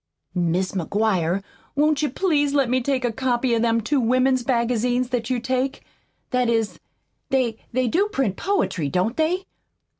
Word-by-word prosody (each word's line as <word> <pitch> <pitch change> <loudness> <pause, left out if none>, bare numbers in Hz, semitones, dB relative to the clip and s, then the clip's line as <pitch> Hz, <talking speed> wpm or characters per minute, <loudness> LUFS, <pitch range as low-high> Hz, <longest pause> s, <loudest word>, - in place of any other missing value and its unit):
"Mis' 180 +1 0
McGuire, 190 -1 0 0.3
won't 300 0 +2
you 300 - +1
please 290 -2 +1
let 270 -4 +2
me 255 0 +2
take 260 0 0
a 240 - +1
copy 250 0 0
of 230 - +2
them 230 0 +2
two 275 +6 +1
women's 255 +1 +2
magazines 245 0 +1
that 245 -2 -2
you 255 -1 +1
take? 260 +2 -2 0.5
That 250 -1 +2
is, 225 -2 0 0.5
they 245 -4 0
they 255 +1 +1
do 370 - +2
print 270 - -1
poetry, 360 - -1
don't 185 - 0
they?" 350 +4 0
250 Hz, 160 wpm, -23 LUFS, 225-270 Hz, 0.5 s, won't